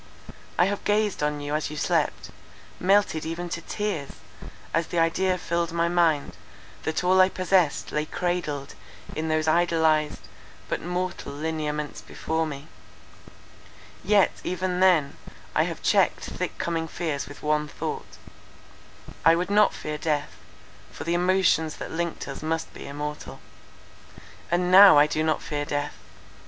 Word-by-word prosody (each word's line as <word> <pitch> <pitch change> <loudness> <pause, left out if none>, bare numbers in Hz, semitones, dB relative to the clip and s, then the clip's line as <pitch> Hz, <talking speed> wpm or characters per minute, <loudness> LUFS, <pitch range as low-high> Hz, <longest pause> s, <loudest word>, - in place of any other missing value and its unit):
I 175 - +5
have 200 +1 -2
gazed 210 -3 +1
on 150 0 -1
you 145 +1 -4
as 155 -1 -1
you 150 - -7
slept, - - 0 0.5
melted 195 -4 +2
even 170 +2 -4
to 170 - -4
tears, 195 -10 -3 0.6
as 165 0 +1
the 175 - -4
idea 180 +3 +2
filled 170 -1 -1
my 170 0 +1
mind, 160 - +1 0.5
that 160 +2 -1
all 185 +1 +5
I 185 - +5
possessed 185 -4 +1
lay 150 0 -1
cradled 165 -6 -2 0.4
in 160 +1 -2
those 155 0 0
idolized, 160 -2 +2 0.5
but - - -2
mortal 180 +1 -3
lineaments 150 -1 -3
before 160 0 -2
me. 140 0 -7 1.4
Yet, 205 -2 +4
even 180 0 -2
then, 170 -7 +3 0.4
I - - +3
have - - -6
checked - - +3
thick - - -4
coming 165 -1 -2
fears 155 -4 -3
with 145 - -12
one 150 0 +1
thought; - - -6 1.1
I 165 - +6
would 180 +3 -2
not 210 0 +5
fear 150 0 -5
death, 150 -2 -1 0.6
for - - -7
the 170 - -1
emotions 175 -3 +2
that - - -7
linked 170 0 -3
us 140 - -7
must 160 +1 -3
be - - -9
immortal. 150 +1 -6 1.1
"And 180 +1 +1
now 195 -2 +10
I 145 - +7
do 155 +1 -1
not 155 0 0
fear 145 -1 -3
death. 145 0 -2
165 Hz, 145 wpm, -25 LUFS, 150-180 Hz, 1.4 s, now